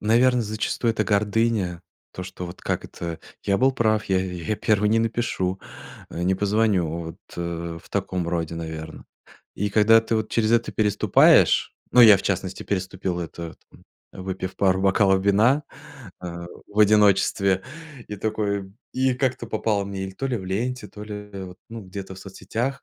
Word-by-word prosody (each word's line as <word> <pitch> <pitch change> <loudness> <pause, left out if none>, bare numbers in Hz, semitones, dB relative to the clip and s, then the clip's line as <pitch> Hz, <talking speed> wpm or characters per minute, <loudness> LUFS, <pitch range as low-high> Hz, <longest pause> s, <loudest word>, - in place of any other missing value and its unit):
наверно, 120 +3 +3
зачастую, 110 +2 -1
это - - 0
гордыня. 105 -4 +1 0.3
То, 90 - -6
что 90 -1 -7
вот 85 - -10
как - - -2
это? 85 -1 -6 0.2
Я 100 -1 +2
был 130 +1 +4
прав, 110 -4 +1
я 95 -1 +2
я 90 +2 -3
1 105 -1 +2
не 115 +1 +3
напишу, 115 -5 -1 0.5
э, 85 - -5
не 95 +2 +2
позвоню. 100 -3 +1
Вот, 80 0 -5 0.2
э, 85 -1 -4
в - - -19
таком 95 -3 -2
роде, 85 -1 -2
наверное. 80 -1 -7 0.5
И 105 - -1
когда 110 +2 +6
ты 115 0 -1
вот 110 0 -2
через 110 -1 +1
это 115 0 +2
переступаешь, 105 -2 +4 0.2
ну, 125 - +6
я, 110 -4 +10
в - - -6
частности, - - -2
переступил 95 -2 -3
это, 85 0 -7 0.2
там, - - -19 0.4
выпив 95 0 -4
пару 95 -1 +2
бокалов 95 0 +3
вина, 115 +9 +4 0.6
а, 85 -1 -6 0.2
в 105 +1 -8
одиночестве, 100 -2 +4 0.5
и 105 - -5
такой, 100 -2 -2 0.2
и 130 0 +1
как-то 130 -2 -1
попала 110 -2 0
мне 95 -1 -4
или 95 - -6
то 135 +8 -3
ли 125 - -1
в 95 - -8
ленте, 110 +4 -3
то 105 - -10
ли, 105 - -7 0.2
э, 95 -2 -7
ну 115 -1 -8
где-то 95 0 -8
в - - -12
соцсетях. 120 +7 -4
100 Hz, 170 wpm, -24 LUFS, 90-110 Hz, 0.6 s, я